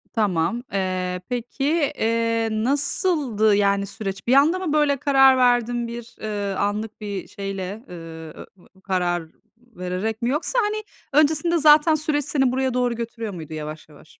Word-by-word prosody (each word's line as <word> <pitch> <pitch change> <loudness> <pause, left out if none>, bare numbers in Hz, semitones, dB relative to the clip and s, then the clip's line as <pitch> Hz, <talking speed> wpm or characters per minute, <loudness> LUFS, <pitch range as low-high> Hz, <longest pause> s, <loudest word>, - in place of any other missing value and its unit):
Tamam. 210 +1 0
Eee, 185 -1 -1
peki, 245 +2 -4 0.3
eee, 230 0 +1
nasıldı, 255 - +1
yani, 200 -1 +2
süreç? 195 -1 -6
Bir 245 - +4
anda 300 +7 +5
mı, 355 -5 -2
böyle, 295 -2 +3
karar 270 -2 +5
verdin? 245 -1 +2
Bir, 235 0 -8
ııı, 205 -2 -3
anlık 210 +2 -2
bir 200 -3 -5
şeyle, 195 +2 -5
ııı, 165 -2 -9 0.4
karar 180 -3 0 0.3
vererek 220 -2 -5
mi? 235 - 0
Yoksa, 305 - 0
hani, 430 -1 -1 0.4
öncesinde 320 +3 +1
zaten 310 +1 +6
süreç 295 -2 -1
seni 270 -4 +1
buraya 260 0 0
doğru 245 -1 +1
götürüyor 230 -2 -5
muydu 160 -3 -8
yavaş 155 0 -7
yavaş? 150 +1 -18
230 Hz, 145 wpm, -23 LUFS, 195-270 Hz, 0.4 s, zaten